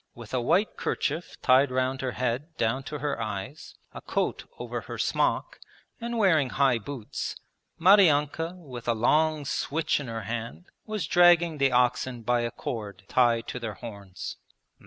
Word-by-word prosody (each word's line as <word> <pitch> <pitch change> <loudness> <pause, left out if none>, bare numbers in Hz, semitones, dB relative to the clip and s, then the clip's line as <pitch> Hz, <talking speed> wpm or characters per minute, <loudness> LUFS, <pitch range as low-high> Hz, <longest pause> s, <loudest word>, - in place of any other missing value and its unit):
With 115 -1 -11
a 130 - +1
white 175 - +1
kerchief 160 -2 -2
tied 130 +2 +5
round 130 +1 -1
her 130 -2 -2
head 130 +6 -3
down 115 +4 0
to 150 +4 -5
her 145 -5 -2
eyes, 110 - -6 0.2
a - - -8
coat - - -2
over - - -4
her - - -7
smock, - - 0 0.4
and 235 0 -3
wearing 165 - +3
high 135 -4 +2
boots, 120 -1 -5 0.4
Maryanka 165 -3 +4
with 130 -9 -10
a 120 - +2
long 150 +6 +2
switch 155 +3 0
in 140 - -6
her 115 -2 -4
hand 115 - -5 0.2
was 215 -2 -2
dragging 175 -3 +5
the 135 -1 +3
oxen 125 0 +1
by 120 +1 +2
a 120 - -1
cord 105 -4 -6
tied 120 -2 +3
to 125 - -4
their 110 -4 -5
horns. 100 -5 -8
130 Hz, 160 wpm, -27 LUFS, 120-155 Hz, 0.4 s, tied